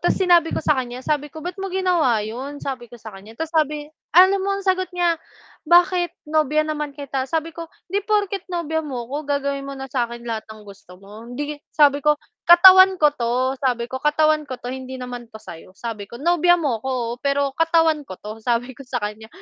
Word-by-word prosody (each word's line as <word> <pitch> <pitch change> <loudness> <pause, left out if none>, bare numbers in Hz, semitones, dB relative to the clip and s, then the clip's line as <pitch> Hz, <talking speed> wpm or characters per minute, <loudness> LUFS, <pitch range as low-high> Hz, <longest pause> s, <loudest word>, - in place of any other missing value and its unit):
ta's - - +1
sinabi 345 -3 +3
ko - - 0
sa - - +4
kan'ya, 255 -2 -4
sabi 295 -1 -1
ko 315 +2 -11
"Ba't 360 +2 -6
mo 390 - -3
ginawa 350 - +1
'yon?" 265 +6 -7
sabi 255 -3 -5
ko 240 - -12
sa 220 -2 -11
kan'ya 205 +4 -13
tapos 320 +3 -5
sabi 300 -2 0 0.3
alam 380 +2 +7
mo 395 +1 -1
ang 395 - -7
sagot 370 -1 +1
niya? 340 -2 +1 0.5
"Bakit? 350 +1 +3
Nobya 310 0 +2
naman 300 -2 -4
kita", 270 -2 -4
Sabi 325 +1 -2
ko 330 0 -8 0.2
"Hindi 405 - +1
porket 405 -3 0
nobya 330 -3 -2
mo 265 -6 -5
'ko 285 +4 -6
gagawin 280 -1 -2
mo 275 - -6
na 270 - -6
sa 250 -3 -2
akin 235 0 -9
lahat 225 -2 -5
ng 215 -1 -12
gusto 195 -3 -14
mo. 210 +5 -13
Hindi" 290 +3 -5 0.2
sabi 290 -1 +5
ko 300 +1 +3 0.3
"Katawan 375 +2 +9
ko 300 -4 +4
'to." 255 0 0
sabi 245 -3 0
ko 260 +2 -6
"Katawan 305 0 +2
ko 255 - -5
'to. 245 0 -7
Hindi 260 0 -7
naman 245 -2 -7
to 220 - -12
sa'yo." 185 -2 -12
sabi 215 -3 -6
ko 235 - -10
"Nobya 350 +4 +3
mo 275 -9 -1
'ko 265 - -5 0.2
oo, - - -3
pero 280 -1 0
katawan 325 -1 +2
ko 185 - -7
'to." 215 +2 -9
sabi 240 +2 -1
ko 255 - -19
sa 255 - -3
kanya 210 +1 -6
285 Hz, 220 wpm, -21 LUFS, 240-330 Hz, 0.5 s, Katawan